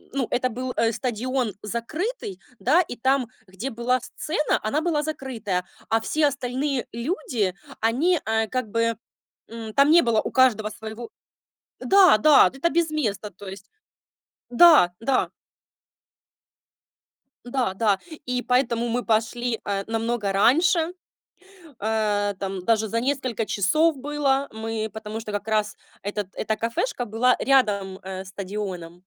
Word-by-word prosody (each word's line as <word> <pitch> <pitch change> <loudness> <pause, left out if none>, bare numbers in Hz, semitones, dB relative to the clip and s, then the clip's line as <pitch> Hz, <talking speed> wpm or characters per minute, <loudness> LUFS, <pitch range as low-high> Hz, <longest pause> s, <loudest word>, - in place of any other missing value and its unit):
ну, 260 -4 0
это 255 +1 +1
был, 255 +2 -4
э, 230 0 +2
стадион 240 0 -2
закрытый, 235 - -4 0.2
да, 310 +9 +4
и 245 - -5
там, 260 +1 +1 0.2
где 190 +8 -5
была 240 +3 0
сцена, 305 +4 -1
она 280 +9 0
была 320 -3 0
закрытая, 230 - -3 0.2
а 225 0 +2
все 300 +6 +2
остальные 270 0 -2
люди, 235 - -2 0.3
они, 295 +11 +2
а, 220 0 +1
как 255 -1 -3
бы, 230 +1 0 0.5
м, 225 -1 -7
там 280 +1 +5
не 340 +1 +7
было 230 -2 +2
у - - -4
каждого 230 -5 +3
своего. 220 +1 -8 0.7
Да, 385 - +6
да, 295 +6 +6
это 270 +6 0
без 340 -1 +1
места, 215 -9 -2
то 200 +2 -12
есть, 190 +1 -10 0.8
да, 245 - +7
да. 255 +3 +1 2.1
Да, 245 -5 -1
да. 205 -2 +2 0.3
И 250 0 -1
поэтому 245 -2 +1
мы 240 +1 -1
пошли, 230 +1 0
э, 200 -1 -2
намного 225 -2 -1
раньше, 325 - +3 0.9
э, 210 -2 0
там 190 -1 -4
даже 220 +1 +2
за 230 +3 -1
несколько 255 -4 -1
часов 305 - +2
было. 280 0 0
Мы, 220 0 -4
потому 220 0 -6
что 215 -2 -7
как 205 +1 -3
раз 215 -1 0 0.3
этот, 205 -1 -3
эта 220 0 -2
кафешка 235 - -2
была 240 +3 +2
рядом, 205 -8 +2
э, 190 0 -6
стадионом. 190 -3 -6
230 Hz, 140 wpm, -24 LUFS, 210-270 Hz, 2.1 s, не